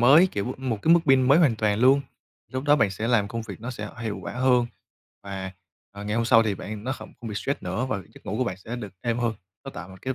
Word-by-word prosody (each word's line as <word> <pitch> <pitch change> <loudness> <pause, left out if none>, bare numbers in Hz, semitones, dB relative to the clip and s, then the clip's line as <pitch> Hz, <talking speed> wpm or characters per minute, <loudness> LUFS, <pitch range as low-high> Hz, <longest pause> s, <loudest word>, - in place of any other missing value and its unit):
mới, 145 +10 +7
kiểu, 100 - -3
m 130 -1 -4
một 110 -3 0
cái 165 - +6
mức 170 - +5
pin 135 -1 +6
mới 140 +5 +5
hoàn 135 -10 +4
toàn 105 0 +1
luôn. 135 +2 +6 0.5
Lúc 130 +2 -3
đó 145 0 +5
bạn 105 -7 +3
sẽ 110 +4 -3
làm 105 -4 +3
công 115 0 -4
việc 110 - -9
nó 125 +2 -5
sẽ 125 - -6
hiệu 110 -3 -3
quả - - -5
hơn, 125 -1 +3 0.6
và, 95 -1 -5 0.4
ờ, 100 0 -8
ngày 105 +2 -1
hôm 115 - +1
sau 115 -1 +6
thì 105 -3 0
bạn 105 +3 -7
nó 130 - -1
không - - -9
không 115 - -6
bị 105 - -5
stress 140 +7 -2
nữa 125 +3 -2
và 100 - -1 0.2
giấc - - -16
ngủ - - -2
của - - +2
bạn 95 - -3
sẽ 115 +6 -7
được 105 -5 -7
êm 120 +2 -1
hơn, 115 -2 0 0.3
nó 135 - -6
tạo 90 - -8
một 95 - -12
cái 130 0 -2
115 Hz, 290 wpm, -25 LUFS, 105-130 Hz, 0.6 s, mới